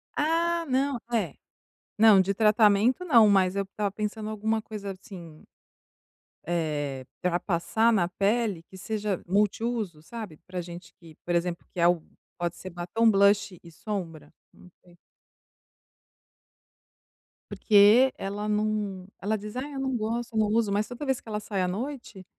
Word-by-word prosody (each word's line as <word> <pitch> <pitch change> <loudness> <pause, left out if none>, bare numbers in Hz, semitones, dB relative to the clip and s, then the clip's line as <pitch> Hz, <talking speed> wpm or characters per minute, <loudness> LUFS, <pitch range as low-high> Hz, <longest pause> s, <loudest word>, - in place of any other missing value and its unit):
Ah 335 +2 +1
não, 270 0 +1 0.2
é. 230 - 0 0.6
Não, 215 -3 +7
de 195 +1 0
tratamento 215 - +3
não, 235 -10 +6
mas 190 -2 +3
eu 200 - 0
estava 200 +1 -3
pensando 215 +1 -4
alguma 220 +1 -1
coisa 210 -2 -6
assim, 175 -4 -12 1.0
eh, 150 -5 -2 0.2
para 180 -1 +1
passar 215 +6 +1
na 175 -5 +2
pele 200 -1 0
que 190 - -15
seja 210 -1 -3
multiuso, 205 -2 -1
sabe. 210 -5 -8
Para 180 -1 -5
gente 175 0 -10
que, 165 -2 -15
por 175 - -1
exemplo 170 0 -1
que - - -12
é - - +4
algo, 175 -2 +2 0.3
pode 175 -1 -2
ser 185 - -8
batom, 175 +7 0
blush 200 -2 +3
e 170 - -13
sombra, 170 -3 -6 0.2
não - - -17 0.2
sei. 175 -1 -21 2.5
Porque 215 +5 +5
ela 205 +2 -4
não, 210 -3 -1
ela 215 +3 0
diz: 210 +2 -9
"Ai 280 +3 -5
eu 275 - -5
não 265 -1 -1
gosto, 230 +1 -3
eu - - +2
não 215 - +3
uso", 220 0 +1
mas 205 +2 +1
toda 245 +4 -7
vez 265 -2 -1
que - - -13
ela 210 -1 -2
sai 205 -2 -3
à 180 - +1
noite, 225 -1 -6
205 Hz, 160 wpm, -27 LUFS, 180-225 Hz, 2.5 s, Não